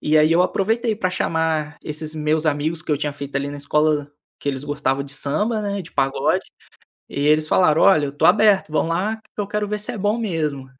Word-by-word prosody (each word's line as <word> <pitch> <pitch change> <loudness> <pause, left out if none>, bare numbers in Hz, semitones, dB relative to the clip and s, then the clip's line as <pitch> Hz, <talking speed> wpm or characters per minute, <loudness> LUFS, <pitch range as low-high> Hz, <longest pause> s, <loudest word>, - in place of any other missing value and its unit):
E 155 +1 +3
aí 155 +2 +4
eu 175 - +4
aproveitei 220 +4 0
pra 185 -4 -1
chamar 160 -3 -1
esses 155 +1 -5
meus 155 +1 0
amigos 155 +2 0
que - - -7
eu 145 - +2
tinha 150 -1 -2
feito 140 -1 -6
ali 140 +1 -2
na 145 - -6
escola, 145 0 0 0.3
que 145 - -4
eles 135 0 -3
gostavam 145 -2 -1
de 140 - -5
samba, 210 +11 -1
né, 200 -1 -2
de 165 - -14
pagode. 135 -1 +1 0.6
E 140 - -5
eles 155 +1 +3
falaram, 160 -4 +4
olha, 155 -7 +5
eu - - -4
estou 145 - +1
aberto, 200 -3 +4
vamos 160 +1 +1
lá 195 +6 0
que 215 -1 -10
eu 205 - -2
quero 210 0 -2
ver 210 0 -2
se 210 - -5
é 215 - -6
bom 205 +4 0
mesmo. 155 - -2
155 Hz, 230 wpm, -21 LUFS, 145-200 Hz, 0.6 s, olha